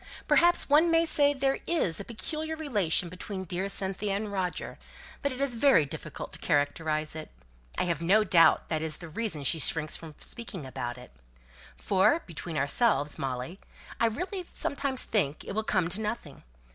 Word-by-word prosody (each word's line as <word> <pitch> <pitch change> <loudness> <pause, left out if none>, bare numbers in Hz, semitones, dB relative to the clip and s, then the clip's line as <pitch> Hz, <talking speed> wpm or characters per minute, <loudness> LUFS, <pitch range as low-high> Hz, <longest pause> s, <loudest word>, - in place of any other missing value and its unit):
Perhaps 345 0 +4
one 305 +4 +5
may 330 0 +4
say 290 -3 +4
there 270 -1 0
is 245 - +2
a - - -4
peculiar 310 +9 -5
relation 210 - 0
between 190 +2 -6
dear 185 +2 -2
Cynthia 195 +1 -1
and 205 +1 -3
Roger, 185 -3 -3 0.4
but 280 - 0
it 255 - -6
is 275 -2 +1
very 235 - +4
difficult 135 - -7
to - - -5
characterize 155 +1 0
it; 155 -1 -7 0.5
I - - +2
have 170 -3 -1
no 200 +6 +4
doubt 165 -5 +4
that 155 -2 -1
is 160 -1 0
the 170 - -9
reason 160 -4 -3
she 160 +4 +1
shrinks 155 0 +3
from 160 -2 -11
speaking 225 - -6
about 130 -2 -5
it. 125 - -13 0.7
For, 205 - +2
between 165 -1 -5
ourselves, 145 - +2
Molly, 130 +7 -4 0.4
I 230 - +4
really 360 - -3
sometimes 280 -2 0
think 155 -9 0
it - - -5
will 220 - 0
come 185 -5 +1
to 195 +5 -3
nothing. 210 -10 -5
190 Hz, 175 wpm, -29 LUFS, 155-255 Hz, 0.7 s, one